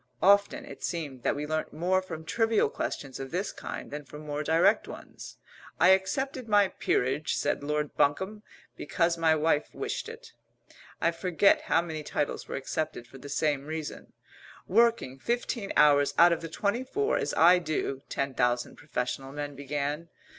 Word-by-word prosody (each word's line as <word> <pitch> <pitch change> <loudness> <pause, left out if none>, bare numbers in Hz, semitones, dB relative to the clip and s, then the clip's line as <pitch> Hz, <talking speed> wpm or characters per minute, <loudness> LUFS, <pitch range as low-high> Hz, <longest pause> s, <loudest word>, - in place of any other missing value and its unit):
Often 200 +1 +4
it - - -11
seemed 145 -7 -4
that - - 0
we 145 +1 -3
learnt 155 +1 -3
more 180 +4 +1
from 160 -4 -8
trivial 225 -3 +2
questions 135 -2 -4
of 135 0 -5
this 185 +6 -2
kind - - -7
than 150 +1 -5
from 150 +2 -11
more 145 0 -3
direct 165 +7 +3
ones. - - -10 0.4
"I - - +6
accepted 255 +7 +1
my 205 -2 +5
peerage," 135 +1 0
said 145 - 0
Lord 150 0 -2
Bunkum, 190 +9 +1 0.3
"because 170 -1 0
my 165 -1 +3
wife 155 -1 0
wished - - -4
it." 460 0 -11 0.7
I 170 - +2
forget 180 +3 +3
how - - +4
many 160 -2 -5
titles 150 -1 -3
were - - -5
accepted 140 -1 -3
for 135 +3 -14
the 145 - -10
same 145 -1 0
reason. 155 -1 -6 0.5
"Working 230 - +2
fifteen 235 - -2
hours 145 -1 +5
out 170 0 +7
of 165 - -3
the 165 - -6
twenty 205 +8 -1
four, 420 +11 0
as 460 -3 -2
I 175 +2 +6
do 150 -5 -2
" - - -40
ten 140 -1 -2
thousand 125 -1 0
professional 135 -1 -4
men 145 0 -5
began. 145 +3 -3
160 Hz, 170 wpm, -28 LUFS, 145-190 Hz, 0.7 s, out